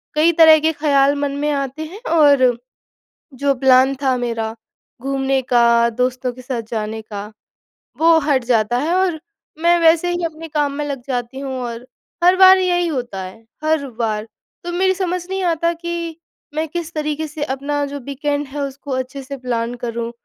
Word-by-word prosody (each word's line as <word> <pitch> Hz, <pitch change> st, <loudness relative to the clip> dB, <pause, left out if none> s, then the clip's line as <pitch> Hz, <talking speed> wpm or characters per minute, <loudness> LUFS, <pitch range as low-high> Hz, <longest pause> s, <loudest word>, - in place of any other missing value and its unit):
कई 320 Hz, +3 st, +4 dB
तरह 315 Hz, -1 st, +7 dB
के 320 Hz, +1 st, +2 dB
ख़्याल 285 Hz, -1 st, +3 dB
मन 285 Hz, -1 st, 0 dB
में 295 Hz, +1 st, -1 dB
आते 275 Hz, +2 st, -3 dB
हैं, 390 Hz, +8 st, -10 dB
और 280 Hz, -7 st, +4 dB, 0.8 s
जो 280 Hz, +1 st, +1 dB
प्लान 265 Hz, +1 st, +5 dB
था 260 Hz, -2 st, +2 dB
मेरा 225 Hz, -2 st, -3 dB, 0.5 s
घूमने 270 Hz, 0 st, 0 dB
का, 235 Hz, -1 st, +5 dB
दोस्तों 250 Hz, +1 st, -1 dB
के 255 Hz, +1 st, -12 dB
साथ 245 Hz, -3 st, -3 dB
जाने 220 Hz, -1 st, -3 dB
का, 205 Hz, -2 st, -7 dB, 0.8 s
वो 330 Hz, 0 st, +6 dB
हट 285 Hz, -4 st, +1 dB
जाता 235 Hz, -1 st, +2 dB
है 320 Hz, +5 st, 0 dB
और 365 Hz, -4 st, +1 dB, 0.4 s
मैं 345 Hz, 0 st, +5 dB
वैसे 330 Hz, +1 st, +4 dB
ही 350 Hz, 0 st, -2 dB
अपने 325 Hz, 0 st, -6 dB
काम 290 Hz, -2 st, 0 dB
में 295 Hz, +1 st, -3 dB
लग 275 Hz, -3 st, -4 dB
जाती 250 Hz, 0 st, -3 dB
हूँ 270 Hz, -1 st, -5 dB
और 235 Hz, +1 st, -6 dB, 0.4 s
हर 360 Hz, +1 st, +6 dB
बार 380 Hz, 0 st, +8 dB
यही 355 Hz, -1 st, +1 dB
होता 245 Hz, -10 st, -4 dB
है, 220 Hz, +5 st, -11 dB, 0.2 s
हर 310 Hz, -3 st, +1 dB
बार। 215 Hz, -1 st, -1 dB, 0.4 s
तो 345 Hz, -, -4 dB
मेरी 375 Hz, +1 st, +2 dB
समझ 360 Hz, -2 st, -2 dB
नहीं 385 Hz, -1 st, -2 dB
आता 335 Hz, -1 st, +1 dB
कि 335 Hz, -1 st, -5 dB, 0.4 s
मैं 315 Hz, +1 st, -1 dB
किस 340 Hz, 0 st, -5 dB
तरीके 305 Hz, 0 st, -2 dB
से 295 Hz, 0 st, -5 dB
अपना 285 Hz, +1 st, -2 dB
जो 285 Hz, 0 st, -6 dB
वीकेंड 285 Hz, +2 st, -3 dB
है, 285 Hz, +2 st, -5 dB
उसको 275 Hz, 0 st, -6 dB
अच्छे 260 Hz, +1 st, -3 dB
से 275 Hz, +1 st, -7 dB
प्लान 240 Hz, -1 st, -3 dB
करूँ। 235 Hz, 0 st, -3 dB
280 Hz, 180 wpm, -19 LUFS, 250-320 Hz, 0.8 s, बार